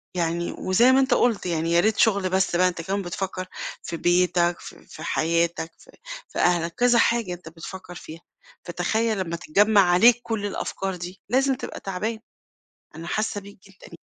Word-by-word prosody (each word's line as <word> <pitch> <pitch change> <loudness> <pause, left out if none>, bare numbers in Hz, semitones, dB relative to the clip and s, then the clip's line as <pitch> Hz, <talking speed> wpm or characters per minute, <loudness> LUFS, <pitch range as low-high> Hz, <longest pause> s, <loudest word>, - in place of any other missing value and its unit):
يعني 170 0 -1
وزي 235 +8 +4
ما 265 - +5
أنت 265 -1 +2
قُلت 230 -6 +1
يعني 165 -1 -1
يا 170 - +4
ريت 215 +4 +2
شُغل 200 -4 +3
بس 190 -1 +1
بقى، 185 +1 +4
أنت 175 -2 -3
كمان 195 +4 -2
بتفكّر 185 +1 -5 0.4
في 170 - -5
بيتك 175 0 +2
في - - -12
في - - -10
حياتك، 170 0 0
في - - -19 0.4
في - - -6
أهلك، 170 -1 +1
كذا 245 -1 +4
حاجة 230 -7 +1
أنت 175 -2 -10
بتفكّر 180 +2 -10
فيها، 160 +1 -10 0.4
فتخيّل 215 +5 -1
لمّا 170 -2 -3
تتجمّع 200 +5 +3
عليك 215 +7 +5
كُلّ 220 -3 -3
الأفكار 195 -1 -3
دي 180 +2 -8
لازم 265 +2 +2
تبقى - - -7
تعبان، 215 +4 -4 0.8
أنا 165 +1 -8
حاسّة 215 0 -2
بيك 200 0 -14
جدًا 185 -3 -15
185 Hz, 175 wpm, -24 LUFS, 170-215 Hz, 0.8 s, ما